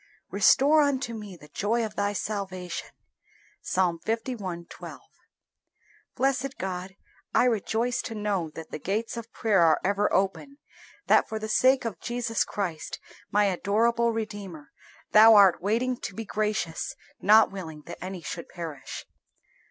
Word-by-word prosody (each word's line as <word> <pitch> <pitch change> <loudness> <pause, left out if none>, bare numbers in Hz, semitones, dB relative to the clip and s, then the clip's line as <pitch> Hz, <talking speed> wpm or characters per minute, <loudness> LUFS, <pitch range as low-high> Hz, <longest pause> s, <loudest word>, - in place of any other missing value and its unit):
"Restore 300 +3 +5
unto 270 -4 0
me 210 -5 -8
the 150 - -15
joy 225 +8 0
of 215 - -7
Thy 205 0 0
salvation." 190 -4 -4 0.7
Ps. - - -4 0.3
li. 220 -7 -3
12. - - -10 1.1
Blessed 270 +1 0
God, 185 0 -5 0.4
I - - +5
rejoice 235 +1 0
to 225 - -6
know 205 -6 -1
that 160 -1 -9
the - - -5
gates 215 +8 -2
of 230 0 -7
prayer 210 -5 +2
are 160 -2 +5
ever 200 +1 +1
open; 195 +9 -1 0.5
that - - +4
for 220 - -3
the 215 0 -4
sake 255 +3 +3
of 205 -7 -4
Jesus 240 -2 -1
Christ, 175 -6 -4 0.3
my 210 0 +3
adorable 225 +5 +2
Redeemer, 205 -8 -6 0.4
Thou 220 +1 +8
art 195 -3 +6
waiting 235 +6 0
to 200 - -7
be 225 - -5
gracious, 210 -6 -2 0.3
not 215 +2 +6
willing 160 -6 -8
that - - -9
any 185 -1 -6
should 170 +1 -6
perish. 165 -6 -7
210 Hz, 145 wpm, -27 LUFS, 185-230 Hz, 1.1 s, Thou